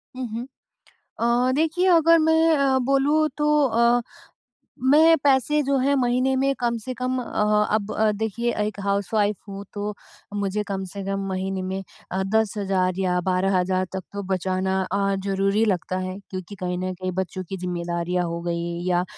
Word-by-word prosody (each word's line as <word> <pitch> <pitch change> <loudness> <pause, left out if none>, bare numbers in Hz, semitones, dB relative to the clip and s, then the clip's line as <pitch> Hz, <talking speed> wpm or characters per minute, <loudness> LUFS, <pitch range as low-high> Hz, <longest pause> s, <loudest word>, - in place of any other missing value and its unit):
हुँ, 255 -1 -4
हुँ। 235 +3 -4 0.7
अ, 240 +2 +2
देखिए 325 +5 +1
अगर 330 +1 +5
मैं 320 0 +4
अ, 270 -2 +3
बोलूँ 290 +3 +3
तो 295 - +1 0.2
अ, 235 0 +3 0.8
मैं 315 +5 +6
पैसे 285 +2 +3
जो 275 0 +1
हैं 275 +2 +2
महीने 255 +1 +2
में 275 +1 +2
कम 235 -1 0
से 255 - -4
कम 255 +1 -2
अ, 210 -2 +1
अब 215 -1 0 0.3
देखिए 220 +2 -1
एक 210 -1 -5
हाउस-वाइफ 205 +1 +1
हूँ 200 0 -7
तो 205 0 -3 0.4
मुझे 205 +1 -1
कम 195 -1 -3
से 200 -1 -5
कम 195 0 -2
महीने 190 0 -2
में 190 +1 -4 0.3
अ, 190 +1 -1
10,000 195 -4 +1
या 180 -1 +1
12,000 185 0 +1
तक 190 - -3
तो 200 0 -4
बचाना 190 +1 0
अ, 195 0 +1
ज़रूरी 195 +2 +1
लगता 185 -2 -1
है। 185 0 -4
क्योंकि 185 +1 -7
कहीं 180 -1 -2
न 185 0 -3
कहीं 185 +1 -4
बच्चों 185 0 -3
की 195 - -4
ज़िम्मेदारियाँ 175 0 -2
हो 170 0 -4
गई 170 0 -3
या 180 0 +2
200 Hz, 165 wpm, -24 LUFS, 185-255 Hz, 0.8 s, मैं